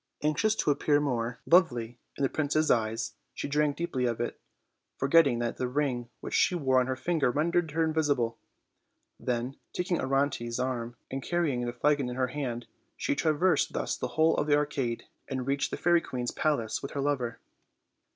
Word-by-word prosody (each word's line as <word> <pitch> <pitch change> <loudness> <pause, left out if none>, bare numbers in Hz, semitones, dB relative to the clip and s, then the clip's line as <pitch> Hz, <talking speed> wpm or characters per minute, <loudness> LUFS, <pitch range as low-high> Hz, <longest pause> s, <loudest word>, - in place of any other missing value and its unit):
Anxious 210 +9 +2
to 150 - +2
appear 145 +1 +2
more 145 -3 0
OLD, - - 0
OLD 115 - -1
FA1RT 120 0 -9
TALES. - - -15
49 175 +2 +10 0.3
lovely 120 +1 -20 0.2
in - - -1
the 135 - +3
prince's 155 +1 +1
eyes, 115 0 0 0.2
she - - -3
drank 145 0 +1
deeply 140 -7 -1
of 115 -2 -1
it, 120 - -3 0.6
forget 160 +4 +5
ting 125 -4 +1
that 120 0 -2
the 125 - -1
ring 125 -3 -1
which - - -6
she 180 - +3
wore 130 -6 +3
on 125 - +1
her 130 0 -2
ringer 165 -7 +2
rendered 160 +5 +1
her 165 +2 +1
invisible. 145 -8 +1 0.8
Then, 125 +2 -2 0.2
taking 180 -1 -1
Orontes' 135 -3 0
arm 120 -2 -2 0.2
and 135 +1 -3
carrying 150 -7 0
the - - -1
flagon 140 +2 +1
in 125 - -5
her 130 0 0
hand, 125 -3 -4 0.3
she - - 0
traversed 160 +2 +2
thus - - -1
the - - -3
whole 160 +1 +5
of 145 - 0
the 145 - +5
arcade, 135 -5 -1 0.2
and 130 -2 -3
reached 140 +1 0
the - - -4
fairy 175 -1 +3
queen's 125 -5 -3
palace 140 -8 0
with 140 - -6
her 140 - -2
lover. 135 -4 -1
140 Hz, 200 wpm, -29 LUFS, 125-155 Hz, 0.8 s, 49